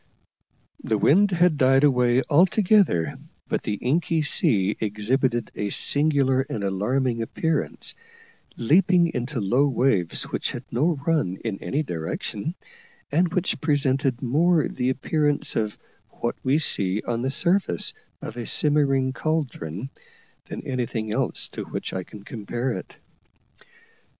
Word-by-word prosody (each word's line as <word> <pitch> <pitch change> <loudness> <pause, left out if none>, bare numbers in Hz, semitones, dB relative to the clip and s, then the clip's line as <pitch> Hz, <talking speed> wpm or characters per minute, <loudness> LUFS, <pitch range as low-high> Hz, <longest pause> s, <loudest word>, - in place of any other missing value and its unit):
The 110 - +1
wind 180 - +4
had 175 -3 +3
died 135 +1 +4
away 125 -2 +3
altogether, 180 - +3 0.3
but - - -1
the 105 - -2
inky 160 - 0
sea 105 -8 +1
exhibited 115 +4 0
a 105 - -3
singular 140 0 +2
and 135 -7 -4
alarming 115 +5 0
appearance, 160 +7 -2 0.6
leaping 175 +6 +3
into 125 +2 -2
low 120 +8 +2
waves 125 -10 +1
which - - -3
had 125 - -6
no 145 +5 +1
run 150 - +1
in 105 -4 -3
any 150 +3 -1
direction, 100 - -4 0.6
and 170 +3 +2
which 180 +1 -1
presented 135 -4 +1
more 155 +6 +3
the 125 0 -2
appearance 145 +2 0
of 105 -1 -1 0.3
what 120 - -3
we 135 +3 +3
see 100 -9 0
on 120 -1 -1
the 130 - -1
surface 170 - +1 0.3
of 115 - -7
a 120 - -5
simmering 135 -3 +2
caldron 130 - -3 0.5
than - - -7
anything 115 -4 -2
else - - -2
to - - -6
which - - -5
I 95 - -2
can 100 +2 -12
compare 120 +4 -3
it. 95 -5 -7
130 Hz, 130 wpm, -24 LUFS, 110-150 Hz, 0.6 s, wind